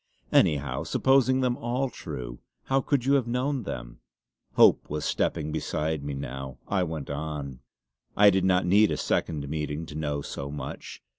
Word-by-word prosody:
Anyhow, 70 -3 +2
supposing 130 -1 +3
them 125 -1 +1
all 125 +3 -1
true, 60 -7 -7 0.2
how 135 0 +1
could 135 -2 0
you 140 - +3
have 135 -4 +2
known 130 +3 0
them?" - - -7 0.6
Hope - - +5
was 75 0 -3
stepping 75 -2 -1
beside 75 -1 -2
me 70 -1 -4
now. 65 -1 -6
I 95 -2 +1
went 80 -5 -3
on: 70 -3 -5 0.6
"I 105 0 +8
did 95 -1 +1
not 90 -1 +3
need 105 +4 +5
a - - -1
second 75 -3 -1
meeting 75 +1 -3
to 75 - -10
know 75 -2 -2
so 70 0 -5
much. 75 0 -7
80 Hz, 165 wpm, -27 LUFS, 70-115 Hz, 0.6 s, I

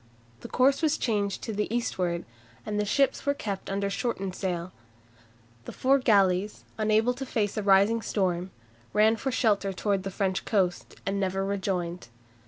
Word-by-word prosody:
The - - -8
course 270 +3 +3
was 310 -2 +2
changed 205 -4 -1
to 225 - -4
the 210 +1 -2
eastward, 180 -7 -1 0.4
and 210 0 -2
the 210 - +1
ships 275 +6 +1
were 285 0 +1
kept 200 -7 -5
under 200 +1 -1
shortened 195 -3 -2
sail. 180 -2 -3 0.9
The - - -6
four 270 +2 +3
galleys, 200 -4 +2
unable 220 +3 +3
to 260 +2 -6
face 215 -6 -1
the 215 - -2
rising 200 +3 +4
storm, 185 -4 -1 0.4
ran 215 +2 +5
for 245 +5 -3
shelter 205 -5 +1
towards 195 +1 0
the 195 - -4
French 190 -1 -1
coast, 185 -5 0
and 195 0 -1
never 195 0 -1
rejoined. 185 -4 -2
200 Hz, 165 wpm, -27 LUFS, 190-225 Hz, 0.9 s, ran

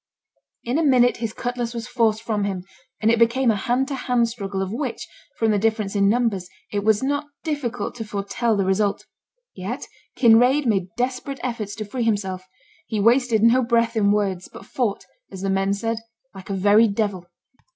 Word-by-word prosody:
In 250 +6 0
a - - +1
minute 250 -4 +4
his 230 -2 -3
cutlass 245 0 -4
was 230 0 -5
forced 225 -3 +1
from 215 -3 -1
him, 190 -3 -3 0.4
and 220 +1 +3
it 230 - +2
became 235 +1 +3
a - - 0
hand 245 +6 0
to - - -3
hand 250 -2 +1
struggle, 200 -4 -5
of 190 - -5
which, 255 0 -4 0.3
from 225 -1 +2
the 205 - +2
difference 215 -1 0
in 200 -1 +4
numbers, 210 -6 0 0.2
it 205 -1 -1
was 215 +2 +3
not 285 +2 -1 0.2
difficult 280 -9 -3
to 225 - -4
foretell 210 +2 -1
the 195 - +1
result. 200 +2 0 0.5
Yet 200 +8 -5 0.3
Kinraid 250 +4 +5
made 195 -6 +1
desperate 255 +3 -2
efforts 220 -5 -3
to 215 - -5
free 245 +5 -4
himself; 190 -5 -1 0.4
he 215 - -2
wasted 230 0 +3
no 235 +3 +5
breath 235 -1 +1
in 205 -2 +3
words, 195 -3 -1
but - - -11
fought, 220 -3 -2 0.3
as 190 - -8
the 195 - 0
men 195 0 +1
said, 225 +3 -1 0.3
'like 190 0 -11
a 195 - -1
very 205 +4 +5
devil.' 200 -4 -2
225 Hz, 190 wpm, -23 LUFS, 200-245 Hz, 0.5 s, Kinraid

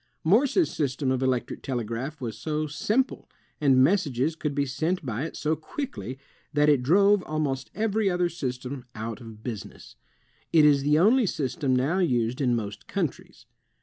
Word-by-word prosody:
Morse's 260 - +3
system 140 -4 -1
of 130 -1 0
electric 130 -2 -1
telegraph 125 +4 -4
was 115 -5 -4
so 155 +5 -2
simple, 215 - -1 0.3
and 135 -3 +5
messages 155 -4 +1
could 150 -3 -3
be 140 -1 +1
sent 160 +5 -2
by 120 +3 -2
it 165 - -7
so 155 +1 0
quickly, 130 - -6 0.4
that 150 0 +4
it 145 -4 +4
drove 200 +8 +4
almost 145 -4 -2
every 215 0 +1
other 180 -1 +1
system 130 -5 -5
out 110 +1 -5
of 110 -2 -11
business. 115 -6 -8 0.5
It 155 -2 +6
is 145 -2 +5
the 150 +2 +3
only 220 +7 +4
system 140 -3 -1
now 140 +9 +1
used 125 -7 +1
in 125 -3 +2
most 105 -2 -5
countries. - - -4
145 Hz, 160 wpm, -26 LUFS, 125-170 Hz, 0.5 s, It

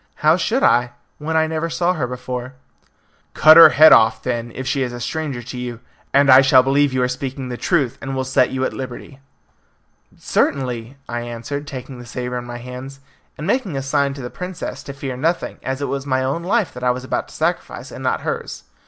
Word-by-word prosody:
"How 155 +1 +6
should 230 +9 0
I, 120 0 +3 0.3
when 160 +2 -1
I 160 - +3
never 160 +1 -2
saw 175 +2 +1
her 145 -8 -2
before?" 125 +1 -6 0.8
"Cut 155 0 +8
her 165 - +11
head 155 +1 +7
off," 110 0 +4
then, 120 -2 -3
"if 130 - -5
she 135 +1 -1
is 125 -2 -1
a 120 - -7
stranger 140 -1 -4
to 125 +2 -8
you, 120 -2 -5 0.3
and 140 0 +4
I 130 +1 +9
shall 130 -1 +5
believe 140 +1 +2
you 130 -1 0
are - - +2
speaking 130 +1 -5
the 125 - -4
truth, 135 -3 0
and 135 -1 -4
will 130 - -1
set 130 -1 +2
you 130 0 -1
at - - -3
liberty." 130 +1 -8 1.0
"Certainly," 125 -2 -1
I 120 - -3
answered, 120 +5 -6
taking 130 -2 -8
the 120 - -11
sabre 125 0 -4
in 120 - -9
my 120 0 -7
hands, 125 +3 -9 0.4
and 150 - -6
making 200 - -1
a 135 - -3
sign 140 0 0
to 135 - -8
the 125 - -6
princess 180 -1 -6
to 140 - -7
fear 135 -2 -5
nothing, 165 +7 -2
as 135 +2 -3
it - - -1
was 140 0 -4
my 130 -1 +1
own 135 +6 -1
life 200 +3 0
that 125 - -9
I 125 - +2
was 125 +1 -1
about 130 - -2
to - - -14
sacrifice, - - -3
and - - -8
not - - 0
hers. - - -5
130 Hz, 225 wpm, -20 LUFS, 125-145 Hz, 1.0 s, her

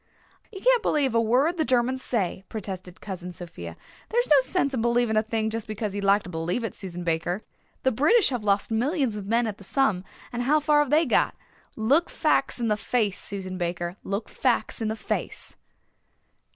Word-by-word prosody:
"You 390 -3 -9
can't - - +4
believe 280 - +1
a 230 - +4
word 260 +10 +2
the 320 - +2
Germans 255 -1 +1
say," 195 -7 -1
protested 185 -4 -7
Cousin 180 -3 -6
Sophia. 90 - -9 0.3
"There 470 - +1
is 485 - +1
no 285 -2 +8
sense 280 +1 0
in 250 - 0
believing 235 -1 +2
a 215 - +5
thing 220 0 -1
just 225 -1 -4
because 215 -1 -3
you'd 205 0 -3
like 200 +1 +4
to - - -9
believe 170 +8 -2
it, 225 - -3
Susan 180 -2 -6
Baker. 175 +4 -1 0.4
The 260 - +3
British 330 - +4
have 245 -5 -3
lost 200 +1 +1
millions 255 +1 +1
of 205 -2 -6
men 230 +2 +2
at 215 -2 -4
the - - -12
Somme 215 -4 +1 0.3
and 240 - -2
how 290 +5 +3
far 300 0 +3
have 295 -2 +2
they 310 +4 +4
got? 250 - +2 0.4
Look 275 +10 +3
facts 275 -4 +1
in 235 - 0
the 210 -1 +1
face, 215 -3 0
Susan 190 -2 -4
Baker, 175 0 -2
look 200 +3 -3
facts 250 -2 0
in 220 - 0
the 220 - -1
face." - - -4
225 Hz, 205 wpm, -26 LUFS, 195-265 Hz, 0.4 s, no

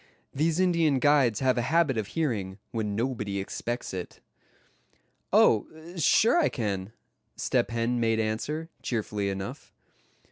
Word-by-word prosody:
These 160 +4 +1
Indian 170 -6 +3
guides 135 -4 +3
have 130 -2 +2
a - - +2
habit 155 +1 +2
of 110 -3 -2
hearing, 105 - -2
when 105 -3 -2
nobody 110 -4 -2
expects 120 +5 -4
it. 90 -1 -6 1.1
"Oh! 110 - +5 0.3
sure, 210 - +4
I 330 - +3
can," 100 -4 -3 0.4
Step - - 0
Hen 115 +1 0
made 115 -1 +1
answer, 145 +9 -2
cheerfully 105 -4 -2
enough. 95 0 -6
120 Hz, 130 wpm, -27 LUFS, 105-150 Hz, 1.1 s, Oh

